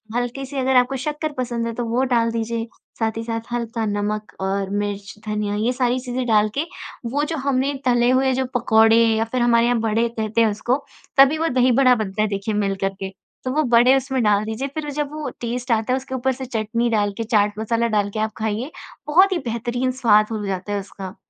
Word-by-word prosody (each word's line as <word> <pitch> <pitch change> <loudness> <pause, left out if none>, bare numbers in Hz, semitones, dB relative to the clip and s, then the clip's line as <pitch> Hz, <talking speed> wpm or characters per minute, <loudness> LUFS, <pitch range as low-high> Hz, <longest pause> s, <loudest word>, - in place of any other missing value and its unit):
हल्के 245 +2 -2
से 270 0 -5
अगर 260 0 +1
आपको 250 +2 +3
शक्कर 300 0 -2
पसंद 235 -2 -2
है 230 - -3
तो 240 - -2
वो 235 +3 0
डाल 230 -1 +2
दीजिए। 230 0 -2 0.3
साथ 225 -1 +1
ही 225 - -3
साथ 230 0 -3
हल्का 230 -1 -2
नमक 210 +1 -2
और 195 0 -1
मिर्च, 205 0 -3
धनिया 210 -1 -1
ये 225 +4 +1
सारी 250 0 +1
चीज़ें 250 0 -3
डाल 215 -1 +4
के 295 - +2 0.5
वो 290 +2 0
जो 320 - -1
हमने 275 0 0
तले 245 -1 +3
हुए 265 0 +3
जो 260 0 0
पकौड़े 225 -1 +5
या 225 -1 +3
फ़िर 245 +2 -2
हमारे 235 -1 +4
यहाँ 240 -1 +2
बड़े 225 +1 +1
कहते 220 0 -1
हैं 225 - +4
उसको 240 +5 0 0.4
तभी 275 +3 +6
वो 325 +1 0
दही 255 0 +4
बड़ा 255 -1 +6
बनता 210 -2 -2
है 215 - +2
देखिए 200 +2 -2
मिलकर 195 -1 -1
के 190 -1 -4 0.4
तो 255 - -1
वो 310 - +3
बड़े 245 +3 +6
उसमें 265 0 -1
डाल 210 0 +3
दीजिए। 220 +5 -3
फ़िर 310 -1 -3
वो 290 - -4
जब 295 0 -3
वो 305 -1 -4
टेस्ट 245 +2 -3
आता 225 +2 +1
है - - +2
उसके 260 0 -6
ऊपर 260 +1 0
से 260 +1 -6
चटनी 230 0 -1
डाल 205 -3 +1
के, 230 - -1
चाट 210 -2 +1
मसाला 230 +1 0
डाल 205 -2 +1
के 215 - -4
आप 220 0 0
खाइए 220 +6 -2 0.4
बहुत 370 +6 +5
ही 360 - 0
बेहतरीन 240 +3 -1
स्वाद 215 -2 +5
हो 215 -2 -3
जाता 190 +2 -3
है 200 - 0
उसका। 190 -1 -8
230 Hz, 230 wpm, -21 LUFS, 215-255 Hz, 0.5 s, तभी